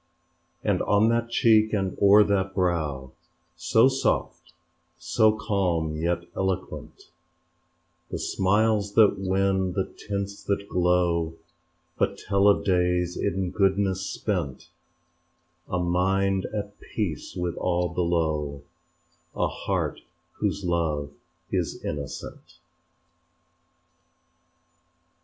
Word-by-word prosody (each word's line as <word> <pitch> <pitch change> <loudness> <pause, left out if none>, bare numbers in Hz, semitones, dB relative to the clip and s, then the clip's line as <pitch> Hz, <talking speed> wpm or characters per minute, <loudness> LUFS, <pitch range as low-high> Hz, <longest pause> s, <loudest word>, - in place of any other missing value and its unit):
And - - +1
on 105 +2 +3
that 115 0 0
cheek 110 -2 +4
and 95 -3 -1
o'er 100 +1 +7
that 95 -2 0
brow 80 -8 -1 0.4
So 90 +9 +4
soft, 135 0 -1 0.5
so 110 0 +2
calm 90 -8 0
yet 85 +2 -1
eloquent, 95 -1 -4 1.0
The - - -3
smiles 105 +1 +1
that 110 -3 +5
win, 95 -1 +1
the 95 0 0
tints 100 -1 -5
that 100 0 -1
glow 85 -3 +1 0.6
But 100 0 +1
tell 100 0 +2
of 100 - +4
days 90 -1 +1
in 90 0 -1
goodness 95 -1 +1
spent 90 -8 -3 1.0
A 90 - -1
mind 95 +2 +1
at 105 -1 -5
peace 95 - -4
with 90 -1 -2
all 90 -1 0
below, 80 -5 -1 0.7
A - - +1
heart - - -3 0.4
whose 100 - -1
love 80 -4 -1 0.4
is - - -1
innocent. 70 -2 -6
95 Hz, 100 wpm, -26 LUFS, 85-100 Hz, 1.0 s, o'er